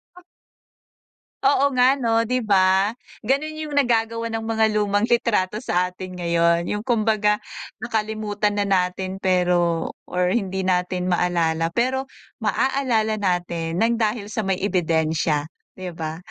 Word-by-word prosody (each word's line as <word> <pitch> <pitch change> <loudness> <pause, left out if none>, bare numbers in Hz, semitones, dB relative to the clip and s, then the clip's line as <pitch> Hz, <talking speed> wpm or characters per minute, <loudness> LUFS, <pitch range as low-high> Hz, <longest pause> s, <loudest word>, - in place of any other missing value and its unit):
Ah. 360 - -15 1.2
Oo 280 0 +4
nga 250 +2 +6
'no', 230 -4 +1
di 250 +2 0
ba, 190 -2 +3 0.3
gano'n 280 +7 0
yung 300 -2 -4
nagagawa 230 -3 +1
ng 225 - -2
mga 225 0 +1
lumang 205 0 +1
litrato 220 -4 +1
sa 180 -6 +1
atin 185 0 -8
ngayon, 170 0 +2
yung 210 +3 -2
kumbaga 215 -3 +1 0.4
nakalimutan 215 -2 -2
na 205 - +1
natin 190 0 -1
pero 175 -3 +1 0.2
or 180 0 +1
hindi 190 -4 -1
natin 180 0 0
maalala 170 -2 +1
pero 260 +7 -1 0.3
maaalala 220 -1 0
natin 175 -3 -1
ng 230 +3 +1
dahil 215 -1 -1
sa 220 - -1
may 190 -2 -1
ebidensya, 160 -4 0 0.3
di 185 -2 -6
ba? 160 -1 -5
205 Hz, 130 wpm, -22 LUFS, 180-225 Hz, 1.2 s, nga